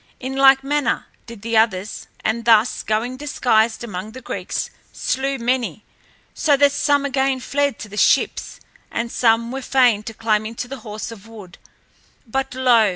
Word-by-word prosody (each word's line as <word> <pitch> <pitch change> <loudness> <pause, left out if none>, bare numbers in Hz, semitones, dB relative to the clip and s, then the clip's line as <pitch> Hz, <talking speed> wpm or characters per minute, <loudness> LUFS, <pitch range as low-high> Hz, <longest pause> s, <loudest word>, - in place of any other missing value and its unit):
In 265 +1 -5
like 270 0 +6
manner 290 -1 0 0.2
did 230 -3 -11
the 230 0 -2
others, 215 -3 +1 0.2
and 230 +2 0
thus, 225 0 +4
going 230 +4 -1
disguised 240 -6 +1
among 210 -1 -6
the 260 - -9
Greeks, - - -4 0.2
slew 270 +2 -1
many, 235 -5 -1 0.5
so 290 -3 +2
that 285 0 +5
some 285 0 +1
again 270 -1 +1
fled 280 0 -1
to - - -8
the 210 0 -10
ships - - +2 0.3
and 235 0 -3
some 230 0 +2
were 270 +1 -4
fain 250 -5 +3
to 225 +1 -7
climb 215 -1 +1
into 230 +2 -6
the 270 +1 -7
horse 215 0 -7
of 225 -1 -12
wood. 210 -6 -12 0.7
But 265 +2 -3
lo! 240 -5 +4
235 Hz, 165 wpm, -21 LUFS, 220-270 Hz, 0.7 s, like